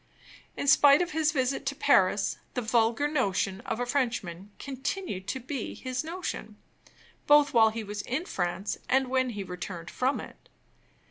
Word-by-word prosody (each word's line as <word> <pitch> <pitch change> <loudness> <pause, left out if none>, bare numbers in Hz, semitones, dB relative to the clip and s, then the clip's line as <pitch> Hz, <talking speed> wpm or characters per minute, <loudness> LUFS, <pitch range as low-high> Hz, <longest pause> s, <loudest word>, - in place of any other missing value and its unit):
In - - -2
spite 280 0 +7
of 350 - -6
his 310 0 +1
visit 270 -2 0
to 280 - -1
Paris, 200 -8 +3 0.2
the 250 - -1
vulgar 230 +5 +2
notion 195 -9 0
of 230 -2 -2
a 245 - 0
Frenchman 230 -8 -2
continued 265 - -4
to 265 - -2
be 260 -1 -5
his 255 +1 -3
notion, 325 - -5 0.7
both 290 -1 +6
while 225 -2 +6
he 220 0 -5
was 205 0 -5
in 265 - -3
France 175 - -3
and 265 0 +2
when 260 0 +1
he 205 -4 -5
returned 180 -2 -7
from 260 +3 0
it. - - -12
250 Hz, 160 wpm, -28 LUFS, 205-280 Hz, 0.7 s, spite